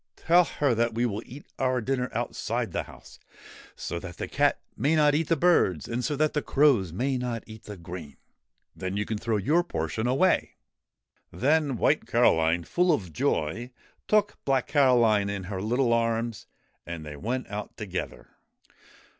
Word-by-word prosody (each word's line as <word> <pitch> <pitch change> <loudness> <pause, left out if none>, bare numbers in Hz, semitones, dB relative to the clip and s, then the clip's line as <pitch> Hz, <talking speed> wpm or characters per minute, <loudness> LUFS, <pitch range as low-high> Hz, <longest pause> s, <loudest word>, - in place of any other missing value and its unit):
Tell 175 +2 +4
her 145 -6 0
that 115 0 0
we 120 +1 +1
will 105 -2 -2
eat 140 +4 -11
our 130 -1 +1
dinner 125 +1 -1
outside 120 -1 -2
the - - -1
house, - - -15 0.6
so 85 - -4
that 90 -1 -9
the - - -4
cat - - +1 0.2
may 145 +8 +1
not 150 -1 +4
eat 155 +1 +1
the 165 - +3
birds 135 - +3
and 120 +1 -2
so 150 - -1
that 155 +1 +1
the 150 - 0
crows 135 - +3
may 130 +8 -1
not 120 -2 -3
eat 110 -1 -12
the 105 -1 -8
grain. 85 -5 -9 0.6
Then 95 +1 -4
you 105 - -1
can 110 -1 -3
throw 115 0 0
your 150 - +2
portion 95 - -3
away.' 140 +9 +2 0.8
Then 145 0 +1
White - - +2
Caroline, 80 +1 +3
full 180 - +2
of 95 - -1
joy, 95 +11 -1 0.4
took 210 -1 +2
Black 135 -2 +1
Caroline 120 -8 +3
in 100 -1 -4
her 95 0 -5
little 120 +3 +1
arms 115 -1 -1 0.4
and 85 -2 -7
they 75 -1 -7
went 120 - -3
out 105 0 -6
together. 95 -5 -5
115 Hz, 170 wpm, -27 LUFS, 100-135 Hz, 0.8 s, Tell